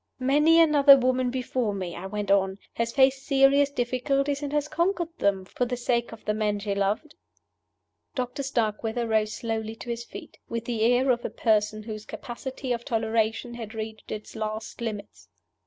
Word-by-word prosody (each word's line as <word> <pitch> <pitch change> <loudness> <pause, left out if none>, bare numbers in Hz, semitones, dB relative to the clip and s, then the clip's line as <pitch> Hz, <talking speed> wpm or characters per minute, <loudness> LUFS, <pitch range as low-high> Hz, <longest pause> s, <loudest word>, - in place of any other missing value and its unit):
"Many 295 +5 +4
another 290 -4 +8
woman 255 0 +1
before 250 -4 -1
me," 185 -3 -4
I 180 +3 -6
went 205 0 -3
on, 195 -1 +2 0.2
"has 230 0 -1
faced 270 0 +3
serious 275 0 +4
difficulties, 275 +2 0
and 290 -1 -3
has 295 0 0
conquered 340 +1 -1
them 195 -2 +1
for 245 - -2
the 245 0 -3
sake 235 -1 0
of 225 - -12
the 210 - +1
man 210 -1 0
she 205 0 -2
loved." 200 +10 -1 1.0
Doctor 250 +1 -3
Starkweather 230 -2 -1
rose 215 -1 +1
slowly 225 -1 -3
to 235 - -6
his 235 0 -4
feet, - - -11
with 230 0 -3
the 230 -2 -2
air 245 +3 +4
of 240 -1 0
a - - -2
person 215 -1 +1
whose 215 -1 -7
capacity 255 +1 -5
of 235 0 -4
toleration 225 +1 0
had 225 -2 -7
reached 220 0 -6
its 215 +2 -7
last 220 +1 -5
limits. 210 -3 -6
235 Hz, 175 wpm, -26 LUFS, 215-265 Hz, 1.0 s, another